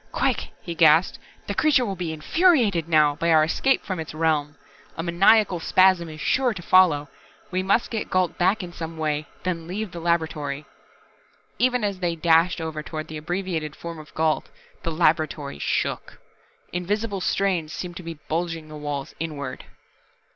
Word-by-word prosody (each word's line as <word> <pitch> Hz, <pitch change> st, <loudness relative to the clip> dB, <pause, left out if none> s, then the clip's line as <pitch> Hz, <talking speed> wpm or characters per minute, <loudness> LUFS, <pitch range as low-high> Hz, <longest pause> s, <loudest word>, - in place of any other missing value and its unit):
"Quick," -, -, 0 dB
he 170 Hz, -, -4 dB
gasped. 160 Hz, +1 st, +4 dB, 0.3 s
"The 200 Hz, -, -3 dB
Creature 275 Hz, +2 st, +3 dB
will 195 Hz, -3 st, -3 dB
be 175 Hz, -3 st, -3 dB
infuriated 205 Hz, -, +2 dB
now, 155 Hz, -3 st, +4 dB
by 170 Hz, +1 st, 0 dB
our 155 Hz, -1 st, +6 dB
escape 265 Hz, +12 st, +1 dB
from 185 Hz, -3 st, -3 dB
Its 160 Hz, -1 st, -6 dB
realm. 155 Hz, -2 st, 0 dB, 0.4 s
A 165 Hz, -, -2 dB
maniacal 185 Hz, +2 st, +4 dB
spasm 185 Hz, -1 st, +3 dB
is 155 Hz, 0 st, -9 dB
sure 250 Hz, +3 st, +1 dB
to 180 Hz, -, -6 dB
follow. 165 Hz, -6 st, +4 dB, 0.4 s
We 185 Hz, 0 st, 0 dB
must 195 Hz, +5 st, +1 dB
get 225 Hz, -2 st, -3 dB
Gault 185 Hz, -2 st, +1 dB
back 190 Hz, +4 st, +2 dB
in 175 Hz, -1 st, -8 dB
some 165 Hz, -1 st, -6 dB
way, 155 Hz, -1 st, -1 dB, 0.2 s
then 165 Hz, -3 st, -3 dB
leave 200 Hz, +2 st, -4 dB
the 175 Hz, -, -7 dB
laboratory." 155 Hz, -4 st, -1 dB, 0.9 s
Even 250 Hz, -2 st, +2 dB
as 200 Hz, -2 st, -1 dB
they 175 Hz, -2 st, -1 dB
dashed 165 Hz, +2 st, +3 dB
over 160 Hz, -2 st, -4 dB
toward 155 Hz, 0 st, -6 dB
the 155 Hz, -, -6 dB
abbreviated 165 Hz, -2 st, -3 dB
form 170 Hz, -1 st, -7 dB
of 155 Hz, -, -12 dB
Gault, 155 Hz, -1 st, 0 dB, 0.3 s
the 165 Hz, -, -3 dB
laboratory 155 Hz, -, 0 dB
shook. -, -, -2 dB, 0.6 s
Invisible 200 Hz, +3 st, -2 dB
strains 180 Hz, -5 st, 0 dB
seemed 175 Hz, -1 st, -6 dB
to -, -, -7 dB
be 165 Hz, -2 st, -7 dB
bulging 165 Hz, -1 st, -3 dB
the 155 Hz, -, -8 dB
walls 145 Hz, -2 st, -5 dB
inward. 145 Hz, -5 st, -5 dB
170 Hz, 170 wpm, -24 LUFS, 155-185 Hz, 0.9 s, our